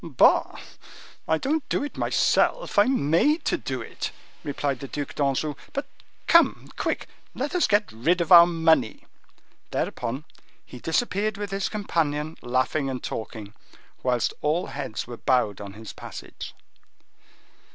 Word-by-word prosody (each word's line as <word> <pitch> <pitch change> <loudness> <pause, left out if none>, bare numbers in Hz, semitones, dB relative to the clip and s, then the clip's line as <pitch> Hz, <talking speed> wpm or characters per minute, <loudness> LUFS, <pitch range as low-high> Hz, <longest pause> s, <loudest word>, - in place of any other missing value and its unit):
"Bah! 150 -8 +3 0.7
I 160 - +3
don't 295 - -1
do - - 0
it 290 - -6
myself; - - +2
I 205 - +7
am 200 - 0
made 295 - +3
to - - +2
do - - -4
it," - - -5 0.3
replied 140 -2 -2
the 140 - -6
Duc 145 +1 -5
d'Anjou. 145 +1 0 0.2
"But 280 - -2 0.4
come, 335 0 +4
quick! - - -2 0.3
let 280 +3 -3
us 360 - +3
get 210 0 +2
rid 155 +12 +1
of 170 +1 -1
our 170 -1 +11
money." 160 -8 +2 0.6
Thereupon 125 +5 -3 0.4
he 125 - -11
disappeared 205 - 0
with 205 -1 -5
his 195 0 -1
companion, 160 -7 -1
laughing 130 +3 0
and 130 -2 -4
talking, 110 -1 -6 0.5
whilst 125 -2 +1
all 155 +4 +1
heads 135 -4 -5
were 120 0 -8
bowed 115 -7 +1
on 100 -1 -8
his 110 -1 -9
passage. - - -9
155 Hz, 145 wpm, -25 LUFS, 125-200 Hz, 0.7 s, our